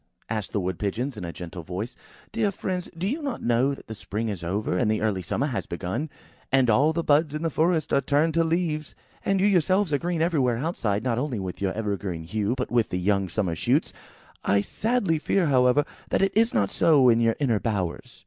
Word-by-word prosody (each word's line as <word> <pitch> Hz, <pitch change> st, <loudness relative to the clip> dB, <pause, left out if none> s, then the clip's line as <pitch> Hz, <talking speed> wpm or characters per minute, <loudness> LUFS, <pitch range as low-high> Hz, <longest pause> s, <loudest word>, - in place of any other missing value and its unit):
asked 110 Hz, -3 st, -2 dB
the 105 Hz, -, 0 dB
Wood 90 Hz, -2 st, -3 dB
pigeons 120 Hz, +6 st, -2 dB
in 105 Hz, -, -7 dB
a 85 Hz, -, -4 dB
gentle 90 Hz, +1 st, -8 dB
voice. 95 Hz, +8 st, -5 dB, 0.4 s
"Dear 225 Hz, -2 st, +1 dB
friends, 185 Hz, -1 st, -4 dB
do 175 Hz, -, -2 dB
you 285 Hz, +9 st, -2 dB
not 275 Hz, -4 st, -4 dB
know 125 Hz, +4 st, +2 dB
that -, -, -15 dB
the 110 Hz, -, -7 dB
spring 110 Hz, +1 st, -4 dB
is 95 Hz, -5 st, -5 dB
over, 95 Hz, +2 st, -1 dB
and 90 Hz, -, +1 dB
the 110 Hz, -, +1 dB
early 105 Hz, -4 st, 0 dB
summer 90 Hz, -, -1 dB
has 130 Hz, -6 st, -3 dB
begun, 90 Hz, -, -3 dB, 0.4 s
and 130 Hz, -3 st, +4 dB
all 140 Hz, +8 st, +4 dB
the 170 Hz, +1 st, -1 dB
buds 150 Hz, 0 st, +3 dB
in 155 Hz, -, -3 dB
the 165 Hz, -, 0 dB
forest 160 Hz, +1 st, +1 dB
are 140 Hz, -, +4 dB
turned 150 Hz, +4 st, +2 dB
to 165 Hz, +1 st, +3 dB
leaves? 160 Hz, -2 st, -1 dB, 0.3 s
And 195 Hz, -1 st, +1 dB
you 190 Hz, -, +3 dB
yourselves 185 Hz, -2 st, +3 dB
are 145 Hz, -, +2 dB
green 175 Hz, +1 st, -2 dB
everywhere 145 Hz, -8 st, +2 dB
outside, 115 Hz, -, -1 dB
not 120 Hz, -2 st, 0 dB
only 130 Hz, -3 st, -2 dB
with 95 Hz, -2 st, -5 dB
your 95 Hz, -1 st, 0 dB
evergreen 100 Hz, -6 st, -3 dB
hue, 105 Hz, +7 st, -1 dB
but 125 Hz, -, -3 dB
with 120 Hz, -2 st, +2 dB
the 90 Hz, -, -2 dB
young 95 Hz, +1 st, +1 dB
summer's 85 Hz, -4 st, -1 dB
shoots. -, -, +1 dB, 0.5 s
I 100 Hz, +1 st, +3 dB
sadly 205 Hz, -, 0 dB
fear, 185 Hz, +3 st, +1 dB
however, 130 Hz, 0 st, +4 dB, 0.2 s
that -, -, +2 dB
it 195 Hz, -, +1 dB
is 230 Hz, +2 st, +4 dB
not 100 Hz, -2 st, +1 dB
so 145 Hz, -6 st, +4 dB
in 115 Hz, -1 st, +5 dB
your 115 Hz, -1 st, +3 dB
inner 120 Hz, -7 st, +2 dB
bowers." 100 Hz, -7 st, -3 dB
125 Hz, 225 wpm, -25 LUFS, 100-160 Hz, 0.5 s, in